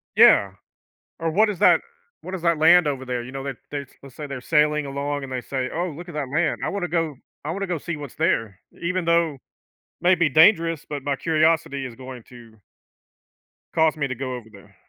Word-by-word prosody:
Yeah. 100 - +6 0.7
Or, 165 0 -1
"What 215 +6 +3
is 195 - -4
that - - +5 0.4
what 185 +1 -6
is 180 - -6
that 170 -1 +2
land 165 +1 +6
over 135 -2 -3
there?" 125 -1 -3
You 130 - -9
know, 135 0 -6
that 135 -3 -5
they 145 -1 -4 0.2
let's 135 -2 -13
say 150 - -6
they're 135 -2 -6
sailing 150 +1 +2
along 140 +1 -3
and 135 - -8
they 130 -1 -3
say, 130 +1 -3
"Oh, 175 +2 -1
look 170 +3 -9
at 165 - -9
that 140 -3 -3
land, 155 +4 0
I - - 0
wanna 195 -3 -2
go 165 -2 -1 0.3
I 155 - -2
wanna 195 +3 -3
go 180 -2 -1
see 170 +2 -5
what's 145 -4 -9
there." 115 - 0 0.2
Even 180 +1 -1
though 170 -3 +2 0.6
may 180 +2 +5
be 170 -2 +2
dangerous, 165 +1 +4
but 145 -2 -5
my 140 0 -1
curiosity 155 -3 +1
is 120 - -9
going 130 -2 -9
to 115 -3 -15 1.2
cause 160 -1 +3
me 145 -2 -1
to 130 - -4
go 130 0 -4
over 120 -3 -9
there. 100 -1 -17
150 Hz, 220 wpm, -23 LUFS, 130-170 Hz, 1.2 s, Yeah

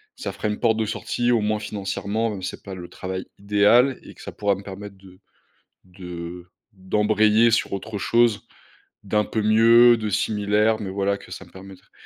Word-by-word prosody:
ça 265 - -5
fera 105 - -4
une 105 - -3
porte 110 -2 +2
de 110 - 0
sortie, 120 +3 -1
au 115 - +2
moins 105 0 0
financièrement. 105 +2 -3
Même 100 -3 -6
si - - -3
c'est - - -13
pas 95 - -8
le 90 -1 -8
travail 95 0 -6
idéal 105 +6 +3
et - - -13
que - - -15
ça - - -7
pourra 100 -1 0
me 100 - -10
permettre 100 +1 -9
de 95 -1 -17 0.6
de 90 -1 -9 0.3
d'embrayer 105 +3 +2
sur 110 - 0
autre 105 +2 -5
chose 115 +1 +1 0.6
d'un 105 +1 0
peu 110 - -2
mieux, 115 +2 +6
de 110 -1 -3
similaire, 105 +2 +1
mais 100 - -4
voilà 100 +1 -1
que - - -15
ça - - -8
me - - -21
permettre 95 0 -14
105 Hz, 195 wpm, -23 LUFS, 95-110 Hz, 0.6 s, mieux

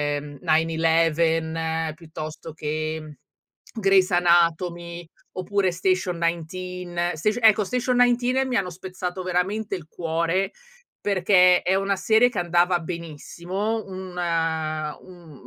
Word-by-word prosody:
ehm, 145 0 -7
911 160 0 +1
piuttosto 155 -1 -8
che, 155 0 -3
mhmm, 155 -1 -11 0.7
Grey's 195 -1 +4
anatomy, 170 0 +1 0.3
oppure 185 0 0
Station 185 -1 0
19. 175 +1 -3
Station 215 +8 -1
ecco 215 -1 +6
Station 250 +2 0
19 245 +2 +3
mi 255 -2 -2
hanno 190 -2 -1
spezzato 185 +1 -6
veramente 195 +3 -1
il 165 -4 -9
cuore 170 +3 -1 0.5
perché 185 -2 +4
è 185 - +2
una 195 +1 +1
serie 220 +5 +4
che 245 - -8
andava 175 +1 +2
benissimo, 175 +6 -4
una 165 -5 -2
un 175 -4 -14
175 Hz, 115 wpm, -24 LUFS, 165-190 Hz, 0.7 s, ecco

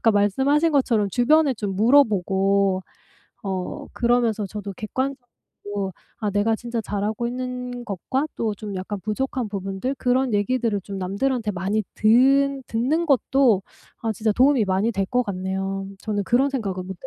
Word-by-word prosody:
아까 225 - +4
말씀하신 270 - +2
것처럼 230 -7 +2
주변에 285 - +3
좀 205 -3 -3
물어보고 195 -5 +3 0.6
어 190 -2 -4
그러면서 235 -3 +1
저도 205 0 -6
객관적으로 215 -5 -5 0.3
아 210 -2 -1
내가 205 +3 +2
진짜 235 0 -4
잘하고 210 +3 -2
있는 250 0 -5
것과 245 - -2
또 220 -2 -1
좀 205 0 -7
약간 190 +2 -4
부족한 240 +3 -2
부분들 195 +6 -3
그런 255 -1 +1
얘기들을 215 0 0
좀 195 0 -7
남들한테 215 +5 -1
많이 195 +4 -1
듣 270 +5 +4
듣는 265 +9 0
것도 260 -6 +3 0.4
아 225 -1 0
진짜 215 0 0
도움이 260 0 +4
많이 190 +4 +1
될 195 -2 0
것 250 +4 +1
같네요. 195 0 -3
저는 205 -2 -2
그런 260 +6 +2
생각을 195 -9 -3
못 190 - -5
220 Hz, 315 characters per minute, -23 LUFS, 200-255 Hz, 0.6 s, 아까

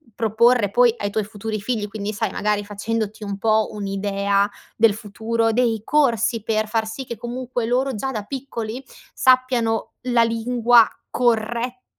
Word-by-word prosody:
proporre 225 -1 +3
poi 240 +1 +4
ai 205 - -2
tuoi 210 0 -1
futuri 215 +1 -5
figli, 210 0 -2
quindi 210 0 -4
sai 215 -1 -2
magari 210 0 0
facendoti 215 +1 -3
un 200 -1 -4
po' 220 +1 +2
un'idea 200 0 0 0.3
del 225 -2 +5
futuro, 225 +2 -1
dei 230 -2 +1
corsi 235 -6 +1
per 215 -1 0
far 220 0 0
sì 240 +5 -6
che, 235 -2 -6
comunque, 245 +1 -4
loro 255 +3 0
già 265 +5 -3
da 215 -5 -4
piccoli 250 -1 -5 0.3
sappiano 255 -3 +2
la 245 -2 +3
lingua 230 0 +4 0.2
corretta, 240 +1 0
225 Hz, 150 wpm, -22 LUFS, 210-245 Hz, 0.3 s, del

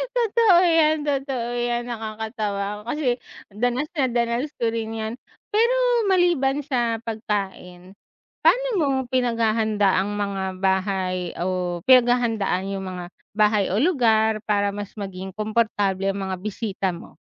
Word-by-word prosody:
Totoo 455 -4 +4
yan, 325 -2 +4
totoo 270 -4 -1
yan 240 0 -1
nakakatawa 215 -2 -4
kasi 255 -3 0 0.3
danas 245 +8 -1
na 270 - +3
danas 240 +4 0
ko 230 - +2
rin 225 -1 -3
'yan. 220 0 -4 0.4
Pero 460 +4 +3 0.4
maliban 330 -7 +2
sa 240 -5 0
pagkain, 195 -5 -5 0.5
paano - - +4
mo 300 - +2 0.3
pinaghahanda 220 -5 +2
ang 205 +1 -3
mga 200 -1 -2 0.2
bahay 190 -2 0
o 180 -1 -1
pinaghahandaan 235 -6 +3
yung 190 -1 -4
mga 180 -1 -6 0.3
bahay 210 -2 +3
o - - +1
lugar 220 -9 +3
para 205 -1 +1
mas 205 -1 -6
maging 190 -2 -6
komportable 205 -3 0
ang 195 - -5
mga 185 - -2
bisita 200 -2 -3
mo? 170 - -10
220 Hz, 130 wpm, -23 LUFS, 195-245 Hz, 0.5 s, Totoo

